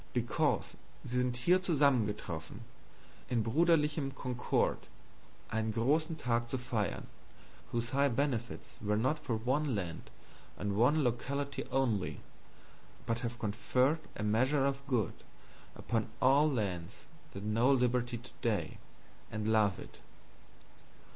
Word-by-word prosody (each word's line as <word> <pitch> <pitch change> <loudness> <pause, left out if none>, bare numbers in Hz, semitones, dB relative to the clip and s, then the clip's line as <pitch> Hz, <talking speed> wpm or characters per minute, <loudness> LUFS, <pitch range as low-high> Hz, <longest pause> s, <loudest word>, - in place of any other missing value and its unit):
Because - - 0 0.3
sie 125 - -3
sind 125 -1 0
hier 180 +9 +3
zusammengetroffen, 120 - 0 0.7
in 120 -3 +1
Bruderlichem 150 +1 +2
concord, 125 -2 -1 0.6
ein 110 0 0
grossen 155 +9 +1
Tag 120 -4 0
zu 130 - -1
feirn, 115 -6 -2 0.7
whose 120 0 -2
high 140 +1 +4
benefits 120 -2 -2
were 105 0 +1
not 130 +7 +1
for 130 -6 -2
one 130 +3 0
land 90 -5 -4 0.5
and 100 -1 -2
one 140 +8 +4
locality, 140 +3 -2 1.4
but 115 0 0
have 120 -1 -4
conferred 125 +7 +1 0.2
a 105 - -4
measure 130 +7 +2
of 140 0 0
good 120 -6 +1 0.6
upon 115 -2 -1
all 140 +4 +5
lands 95 - -3 0.3
that 100 - -6
know 115 +5 +3
liberty 125 -2 +2
today, 115 -2 -3 0.5
and 110 0 -2
love 105 -3 +3
it. - - -11
120 Hz, 115 wpm, -33 LUFS, 110-140 Hz, 1.4 s, all